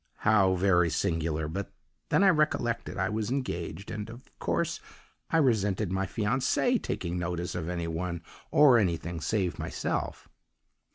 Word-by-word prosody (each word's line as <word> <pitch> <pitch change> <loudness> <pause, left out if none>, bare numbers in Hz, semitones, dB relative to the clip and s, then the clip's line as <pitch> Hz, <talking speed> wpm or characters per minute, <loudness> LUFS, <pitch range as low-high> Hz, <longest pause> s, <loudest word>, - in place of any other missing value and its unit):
How 95 -4 +5
very 90 -2 +3
singular. 80 -1 -1
But 95 +5 -4 0.4
then - - +4
I 195 - +7
recollected 140 -8 0
I 95 0 +1
was 110 0 -2
'engaged,' 100 - -3
and, 105 0 -5
of 120 +4 -12
course, 170 0 -1 0.5
I 165 - +2
resented 105 - +2
my 95 0 0
fiancée 130 - +1
taking 90 0 -3
notice 90 0 -3
of 85 -1 -3
any 85 -1 -2
one 85 +1 -3 0.3
or 135 -5 +6
anything 85 -3 -1
save 95 -1 -1
myself. - - -3
95 Hz, 145 wpm, -29 LUFS, 85-115 Hz, 0.5 s, I